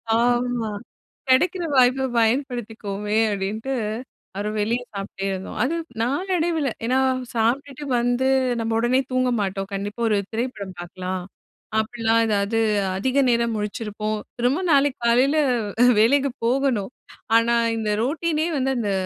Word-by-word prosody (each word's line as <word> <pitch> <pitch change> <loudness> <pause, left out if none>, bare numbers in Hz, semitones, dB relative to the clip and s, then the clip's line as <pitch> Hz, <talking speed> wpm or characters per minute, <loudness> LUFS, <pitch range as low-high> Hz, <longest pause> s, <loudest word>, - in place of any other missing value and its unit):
ஆமா, 240 -1 +1 0.6
"கெடைக்கிற 350 +7 +3
வாய்ப்ப 255 +1 +4
பயன்படுத்திக்குவோமே" 225 -4 -1
அப்டின்ட்டு, 210 +6 -3 0.6
அப்பறம் 210 +2 -3
வெளியே 235 +4 0
சாப்பிட்டே 195 -1 -5
இருந்தோம். 190 0 -5
அது 290 +6 0 0.3
நாளடைவில 325 +2 0 0.2
ஏன்னா, 255 +2 +2 0.3
சாப்ட்டுட்டு 265 +5 -1
வந்து, 245 +2 +1 0.3
நம்ம 225 0 -1
உடனே 245 +3 +2
தூங்க 255 0 +2
மாட்டோம். 195 0 -3
கண்டிப்பா, 205 +4 -4
"ஒரு 210 - +3
திரைப்படம் 220 -5 -4
பாக்கலாம்!" 185 +1 -5 0.6
அப்படிலாம் 225 +1 +1
ஏதாவது, 210 +1 +1 0.4
அதிக 260 +7 +1
நேரம் 235 -1 +2
முழிச்சிருப்போம். 215 0 -3 0.2
திரும்ப 250 +7 +2
நாளைக்கு 280 -1 +3
காலையில 255 +6 +4 0.5
அ - - +7
வேலைக்கு 275 +5 +4
போகணும். 250 -4 +1 0.5
ஆனா, 235 +1 +3 0.2
இந்த 220 -1 -2
ரொட்டினே 315 +4 0
வந்து, 265 0 +1
அந்த 210 -4 -1
235 Hz, 120 wpm, -23 LUFS, 210-265 Hz, 0.6 s, அ